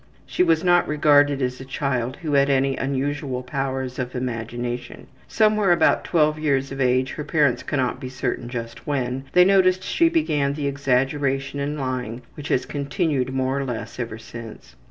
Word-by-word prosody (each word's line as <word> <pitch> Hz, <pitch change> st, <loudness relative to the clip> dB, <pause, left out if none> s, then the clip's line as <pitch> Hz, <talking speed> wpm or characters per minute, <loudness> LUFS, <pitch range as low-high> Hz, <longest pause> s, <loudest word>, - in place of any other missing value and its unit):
She -, -, -2 dB
was 165 Hz, -2 st, +3 dB
not 175 Hz, -1 st, +4 dB
regarded 145 Hz, -2 st, +4 dB
as 125 Hz, +1 st, -2 dB
a -, -, -6 dB
child 130 Hz, -2 st, -2 dB
who 155 Hz, -2 st, -2 dB
had 140 Hz, 0 st, +4 dB
any 135 Hz, 0 st, +2 dB
unusual 135 Hz, -1 st, -2 dB
powers 130 Hz, 0 st, -3 dB
of 125 Hz, 0 st, -4 dB
imagination. 120 Hz, 0 st, -4 dB, 0.2 s
Somewhere 215 Hz, -3 st, +3 dB
about 170 Hz, -2 st, +3 dB
12 155 Hz, -2 st, +2 dB
years 135 Hz, -3 st, 0 dB
of 135 Hz, 0 st, -4 dB
age, 130 Hz, 0 st, +2 dB
her 150 Hz, -, -5 dB
parents 150 Hz, -4 st, +2 dB
cannot 130 Hz, -4 st, -1 dB
be 130 Hz, -, -6 dB
certain 125 Hz, -1 st, -3 dB
just 115 Hz, -1 st, -7 dB
when, 135 Hz, -2 st, -2 dB
they 180 Hz, 0 st, +7 dB
noticed 185 Hz, -1 st, +4 dB
she 335 Hz, -, +2 dB
began 150 Hz, -, +1 dB
the 145 Hz, 0 st, -4 dB
exaggeration 140 Hz, 0 st, 0 dB
and 145 Hz, +2 st, -2 dB
lying 125 Hz, -2 st, -3 dB
which 145 Hz, -1 st, -8 dB
has 125 Hz, -, +1 dB
continued 140 Hz, -2 st, -1 dB
more 130 Hz, +1 st, 0 dB
or -, -, -1 dB
less 125 Hz, -2 st, -5 dB
ever 115 Hz, -2 st, -4 dB
since. 115 Hz, -1 st, -11 dB
135 Hz, 175 wpm, -23 LUFS, 125-150 Hz, 0.2 s, they